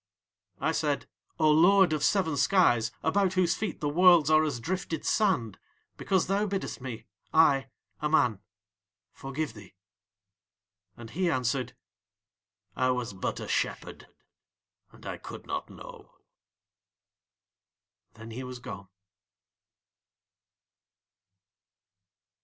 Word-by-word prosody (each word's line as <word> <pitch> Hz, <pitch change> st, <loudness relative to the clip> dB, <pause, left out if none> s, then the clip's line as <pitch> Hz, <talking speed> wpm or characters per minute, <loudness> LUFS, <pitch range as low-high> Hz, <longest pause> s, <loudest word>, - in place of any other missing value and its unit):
"' -, -, -46 dB
"I -, -, 0 dB
said: -, -, -1 dB, 0.3 s
'O 155 Hz, -1 st, +4 dB
Lord 180 Hz, +2 st, +5 dB
of 150 Hz, -, -1 dB
seven 185 Hz, -7 st, +2 dB
skies, 140 Hz, -, +3 dB
about 190 Hz, +3 st, +2 dB
whose 185 Hz, -2 st, +2 dB
feet 210 Hz, -5 st, -4 dB
the 150 Hz, -, 0 dB
Worlds 170 Hz, 0 st, +5 dB
are 155 Hz, 0 st, +5 dB
as 145 Hz, -6 st, -2 dB
drifted 165 Hz, +3 st, -4 dB
sand, 155 Hz, -, +1 dB, 0.4 s
because 190 Hz, -3 st, 0 dB
thou 200 Hz, +2 st, 0 dB
biddest 195 Hz, -8 st, -4 dB
me, 125 Hz, -4 st, -7 dB, 0.3 s
I, 140 Hz, -4 st, +4 dB, 0.3 s
a 150 Hz, -, 0 dB
man, 120 Hz, -10 st, +2 dB, 0.7 s
forgive 135 Hz, 0 st, -5 dB
thee.' 105 Hz, -5 st, -14 dB, 1.2 s
"And 115 Hz, -1 st, -10 dB
he 180 Hz, +5 st, 0 dB
answered: 130 Hz, -2 st, -1 dB, 1.0 s
'I 130 Hz, 0 st, +1 dB
was 125 Hz, -4 st, -2 dB
but 95 Hz, -, -4 dB
a -, -, -6 dB
shepherd, -, -, -3 dB, 0.8 s
and -, -, -17 dB
I -, -, -5 dB
could -, -, -10 dB
not -, -, -4 dB
know.' -, -, -12 dB, 2.1 s
Then 115 Hz, 0 st, -11 dB
he 125 Hz, +4 st, -6 dB
was 125 Hz, 0 st, -7 dB
gone." 100 Hz, -5 st, -9 dB
150 Hz, 115 wpm, -28 LUFS, 125-180 Hz, 2.1 s, Lord